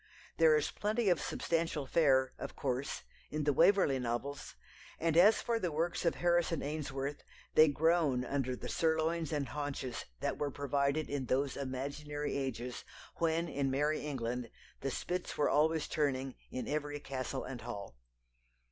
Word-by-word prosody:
There 160 -1 +7
is 150 - 0
plenty 215 +1 0
of 175 - +3
substantial 165 -3 -1
fare, 130 -3 +3
of - - -6
course, 130 0 -2 0.3
in 150 0 -2
the 145 0 +3
Waverley 170 -4 +5
novels, 125 +4 -3 0.4
and 165 -1 +1
as 200 +6 +6
for 235 -1 +1
the 180 -5 -1
works 165 +4 -1
of 170 - +3
Harrison 175 -2 +2
Ainsworth, 140 -1 -3 0.3
they 155 - +8
groan 150 -4 +2
under 130 -2 -1
the - - -7
sirloins 160 0 +1
and 145 -3 -1
haunches 145 -4 -4
that - - -2
were 145 - 0
provided 140 +2 0
in 140 -3 -3
those 135 +2 +1
imaginary 140 +2 -3
ages 125 -3 -3 0.3
when 165 0 +1
in 140 -4 -1
Merry 145 +3 +1
England 125 -4 -3 0.3
the 135 - -2
spits 180 +6 -3
were 150 - +3
always 155 +2 +3
turning 135 -3 0 0.2
in 130 - -4
every 145 0 -2
castle 130 -1 -4
and 125 -3 -6
hall. 100 - -6
145 Hz, 155 wpm, -34 LUFS, 135-160 Hz, 0.4 s, they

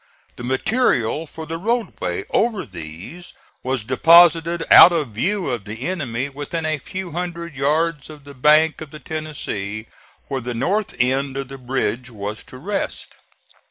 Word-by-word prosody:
The - - -9
material 145 - +1
for 160 +2 -8
the 165 +1 -5
roadway 195 - -2
over 225 -4 +1
these 90 - -10 0.3
was 130 -3 -2
deposited 165 +6 +5
out 180 - +11
of 155 -6 -1
view 175 - -1
of 115 -5 -4
the 110 +5 -5
enemy 135 -8 -2
within 145 +4 -5
a 155 -1 0
few 185 +5 -6
hundred 170 -1 -5
yards 150 +2 0
of 150 -2 -12
the 140 0 -12
bank 155 +4 +4
of 155 - -7
the 155 - -10
Tennessee, 130 -9 -5 0.4
where 135 -1 -3
the 120 0 -4
north 195 - -1
end 135 +2 +1
of 135 -1 -4
the 135 0 -9
bridge 125 -1 -2
was 105 -1 -6
to 130 - -12
rest. 195 +10 -4
145 Hz, 160 wpm, -21 LUFS, 125-170 Hz, 0.4 s, out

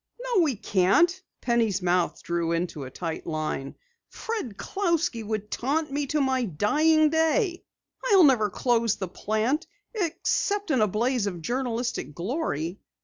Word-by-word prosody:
"No, - - +1
we 295 -7 +2
can't," 205 - +2 0.2
Penny's 225 -6 +1
mouth 180 -1 +1
drew 170 -1 -1
into 170 -4 -2
a - - -7
tight 165 +4 -5
line. 155 -4 -3 0.3
"Fred 420 - -5
Clousky 335 - -1
would 210 -1 -4
taunt 300 +4 -1
me 285 0 -1
to 300 - 0
my 260 -2 +1
dying 300 - +3
day. 340 +4 +1 0.4
I'll 395 -7 +6
never 245 -8 +4
close 230 0 +1
the 190 - -4
plant 220 - -1 0.3
except 405 0 -1
in 260 -5 +3
a 215 - +4
blaze 230 +2 0
of 175 -4 -5
journalistic 240 - -2
glory!" 175 - -3
240 Hz, 145 wpm, -26 LUFS, 190-315 Hz, 0.4 s, I'll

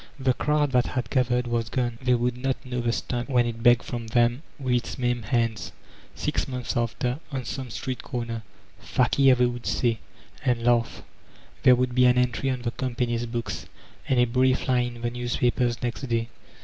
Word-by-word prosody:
The 130 -1 +2
crowd 150 +1 +1
that 125 -1 +3
had 120 -2 -3
gathered 125 -1 +2
was 120 -1 -1
gone; 120 -2 -1
they 125 -1 +3
would 120 0 0
not 135 +1 -2
know 125 -1 -2
the 120 0 +1
Stump 120 +2 -3
when 125 -3 +3
it 115 -1 -4
begged 120 0 +5
from 120 -2 -5
them 120 +3 +2 0.2
with 130 -3 -1
its 120 -1 -1
maimed 120 -3 -1
hands, 115 -2 -1 0.4
six - - -1
months 125 -1 -4
after, 125 +3 -1
on 130 -3 -3
some 130 +1 -5
street 125 +3 -4
comer. 115 -3 -4 0.4
"Fakir" 130 +1 +3
they 125 0 +3
would 120 0 -3
say, 115 -3 +1 0.4
and 120 -2 +1
laugh. 115 -7 +1 0.6
There 125 - +7
would 125 0 0
be 125 0 +4
an 125 0 +5
entry 125 +2 +1
on 125 -2 -2
the 120 - -1
company's 120 -2 -2
books, 115 0 -4 0.4
and 130 - +3
a 120 - +5
brief 130 +2 +2
line 125 -2 +1
in 120 - -11
the 120 - 0
newspapers 120 0 0
next 120 +1 -2
day. 115 -1 -1
120 Hz, 190 wpm, -26 LUFS, 120-125 Hz, 0.6 s, There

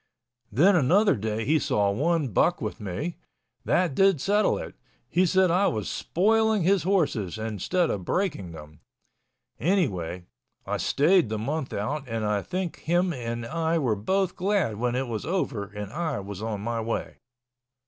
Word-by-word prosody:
Then 175 - +5
another 180 +6 +4
day 110 0 -2
he 155 +3 +3
saw 105 -9 +1
one 150 +5 0
buck 100 - +2
with - - -4
me—that 155 - -3
did 195 +1 +4
settle 205 +8 +2
it. - - -7 0.3
He 185 +1 +2
said 185 0 +3
I 190 +3 +3
was 110 -2 -2
spoiling 220 +2 +1
his 190 +1 +3
horses 150 - 0
instead 110 - -1
of 95 - -3
breaking 150 - -1
them. 75 -1 -12 0.8
Anyway, 95 - 0 0.4
I - - -2
stayed 165 - +3
the 110 - -2
month 135 +5 -3
out 135 +7 -3
and 115 -1 -2
I 105 -1 +1
think 180 - -4
him 175 +2 +1
and 115 -3 -4
I 165 +5 0
were 125 -9 +1
both 190 - 0
glad 190 - 0
when 120 +2 -1
it 130 +1 0
was 115 -3 -4
over 140 - -2
and 105 +1 -8
I 155 -6 -2
was 100 0 -7
on 110 -2 -3
my 115 +1 -2
way. 115 +1 -3
140 Hz, 160 wpm, -26 LUFS, 105-180 Hz, 0.8 s, Then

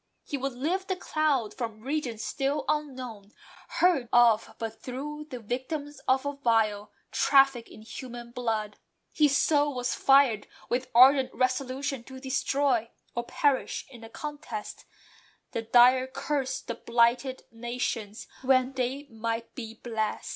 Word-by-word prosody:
He - - -4
Would 275 -1 -2
lift 345 +10 -2
the 375 - 0
cloud 300 - 0
from 225 -3 -5
regions 255 -4 -3
still 275 +2 -1
unknown; 255 -9 -3 0.3
Heard 320 -10 +2
of 230 -2 +4
but 225 -1 -6
through 295 +4 -6
the 250 - -6
victims 265 +5 -4
of 260 +1 +3
a 285 - -1
vile 225 -6 +1 0.2
Traffic 270 -4 +4
in 215 - -13
human 240 +1 -8
blood. 220 -4 -2 0.3
His 290 -2 +4
soul 290 -2 +2
was 250 0 -1
fired 270 -6 +4 0.2
With 250 +1 -1
ardent 265 +2 +7
resolution 255 +1 -1
to 265 -1 -10
destroy, 265 -3 0 0.2
(Or 240 0 -3
perish 280 +2 0
in 240 -3 -12
the 225 - -10
contest) 290 -5 -7 0.7
the 230 - -2
dire 250 +3 +5
curse 270 0 -2
That 235 - -8
blighted 240 +3 +2
nations 230 -2 -4 0.2
when 260 0 +3
they 260 +2 -2
might 230 -1 -4
be 225 -3 -7
blest. 220 -2 -3
255 Hz, 140 wpm, -28 LUFS, 230-275 Hz, 0.7 s, ardent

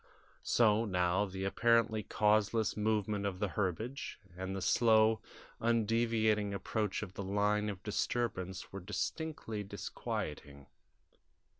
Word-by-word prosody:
So 110 -1 +3
now 90 -1 +1
the 95 -1 -5
apparently 115 +1 +3
causeless 105 +1 +2
movement 105 -1 0
of 95 -2 -3
the 100 +1 -1
herbage, 105 +8 -3 0.2
and 95 +1 -4
the - - -2
slow, 110 -1 +4 0.4
undeviating 110 -2 +2
approach 105 +1 -2
of 95 -3 -8
the - - -5
line 105 +2 +1
of 100 -2 -6
disturbance 100 -4 -2
were 100 - -4
distinctly 115 - -3
disquieting. 75 -7 -5
105 Hz, 115 wpm, -34 LUFS, 95-110 Hz, 0.4 s, slow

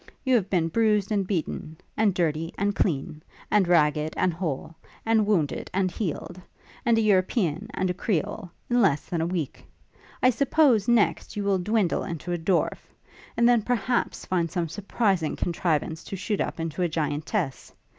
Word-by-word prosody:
You 260 - +2
have 205 -6 +2
been 170 -4 +2
bruised 210 0 +2
and 200 -3 0
beaten; 160 -4 -3 0.2
and 210 -4 +2
dirty 165 -1 0
and 200 +1 0
clean; 150 -2 -1 0.3
and 205 -4 +4
ragged 155 -2 +2
and 180 - +2
whole; 165 -3 -4 0.3
and 220 -2 +3
wounded 165 -9 0
and 190 -1 +1
healed; 180 -1 -4 0.4
and 235 -1 +3
a - - +3
European 185 - +1
and 185 - 0
a 180 - 0
Creole, 195 0 -2 0.2
in 245 0 +2
less 160 -9 +2
than 170 -2 -2
a 165 - 0
week. 170 -6 -3 0.6
I 255 - +6
suppose, 265 -4 +3
next, 235 -3 +2
you 205 - -2
will 200 -1 +2
dwindle 205 -1 +1
into 170 +1 -4
a - - 0
dwarf; 175 +2 +1 0.6
and 235 - +5
then, 240 -2 +5
perhaps, 245 +1 -1
find 170 -3 0
some 170 0 -2
surprising 195 -2 0
contrivance 165 -2 -1
to - - -5
shoot 205 +2 -2
up - - -3
into 165 +1 -3
a 175 - +2
giantess. 155 - -2
185 Hz, 170 wpm, -26 LUFS, 165-210 Hz, 0.6 s, I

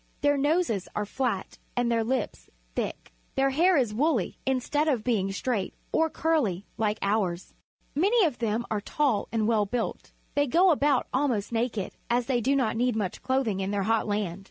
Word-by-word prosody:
Their 290 0 +3
noses 285 - +1
are 210 - -1
flat 230 -3 -3 0.2
and 245 -1 +2
their 230 -1 +2
lips 225 - -2 0.3
thick. - - -4 0.2
Their 270 0 +2
hair 345 +5 +4
is 240 -6 +1
woolh', 265 - +1
instead 265 +4 +1
of 255 -8 +1
being 205 -6 +1
straight 200 -1 -2 0.2
or 320 0 +2
curly 255 - 0
like 215 -1 0
ours. 195 -4 -1 0.4
IVIany 400 +7 +4
of 295 -7 -2
them 230 0 0
are 210 -2 0
tall 255 -3 0
and 220 -2 +1
well 215 -3 +2
built. 240 +2 -3 0.2
They 285 0 +2
go 350 +7 +5
about 285 -3 +2
almost 255 -7 0
naked, 225 -4 -1 0.2
as 240 0 +2
they 245 -1 +1
do 270 +5 +2
not 250 -5 +1
need 245 0 +1
much 205 -4 -2
clothing 260 -7 0
in 190 0 -2
their 200 -1 0
hot 225 +2 +1
land. 205 -4 -1
240 Hz, 180 wpm, -27 LUFS, 210-280 Hz, 0.4 s, go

